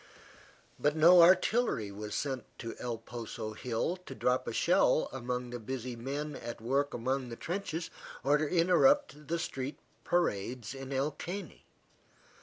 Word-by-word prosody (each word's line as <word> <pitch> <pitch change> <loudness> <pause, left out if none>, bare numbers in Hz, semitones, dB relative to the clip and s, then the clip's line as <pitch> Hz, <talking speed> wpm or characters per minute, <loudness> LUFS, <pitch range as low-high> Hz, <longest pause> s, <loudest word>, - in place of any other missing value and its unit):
But 150 +1 +2
no 170 +3 +8
artillery 185 - +4
was 105 +1 -6
sent 135 -2 -2
to 115 - -6
El 120 -2 -3
Poso 115 -1 -6
hill 120 - -2
to 135 - -7
drop 125 0 +1
a - - -1
shell - - +3
among 125 -1 -3
the 120 - -5
busy 125 +1 -5
men 140 +5 -4
at 120 - -6
work 135 +5 0
among 130 +2 -1
the 115 - -6
trenches, 170 +1 -4 0.3
or 145 +3 +4
to 155 -1 0
interrupt 180 - +3
the 170 +3 0
street 135 -4 -4 0.3
parades 120 - -1
in 135 0 -7
El 135 +3 0
Caney. 180 +7 -7
135 Hz, 150 wpm, -32 LUFS, 120-165 Hz, 0.3 s, no